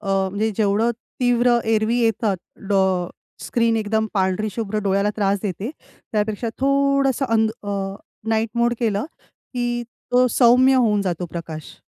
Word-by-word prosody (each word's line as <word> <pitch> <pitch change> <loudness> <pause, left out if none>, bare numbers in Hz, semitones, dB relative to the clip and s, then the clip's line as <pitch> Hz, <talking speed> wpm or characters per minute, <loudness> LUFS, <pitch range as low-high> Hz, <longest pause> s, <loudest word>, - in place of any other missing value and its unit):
अ, 210 - -11 0.2
म्हणजे 215 +3 0
जेवढं 215 +2 +2 0.3
तीव्र 245 -1 +3
एरवी 220 +1 +2
येतात 220 -3 +1 0.3
डो 195 -1 +3 0.6
स्क्रीन 230 -1 +1
एकदम 220 0 0
पांढरी 190 +2 +1
शुभ्र 215 0 -3
डोळ्याला 200 +1 +1
त्रास 200 -1 +1
देते 200 +4 -3 0.4
त्यापेक्षा 215 +2 -1
थोडंसं 275 0 +2
अंध 220 -1 +3
अ, 195 -1 -3 0.3
नाईट 220 0 +1
मोड 240 0 +2
केलं 215 -1 0 0.5
की 240 -1 -1 0.3
तो 250 +1 +5
सौम्य 255 +2 +5
होऊन 220 -5 +3
जातो 180 -2 -2
प्रकाश. 160 -2 -8
220 Hz, 135 wpm, -22 LUFS, 200-240 Hz, 0.6 s, तो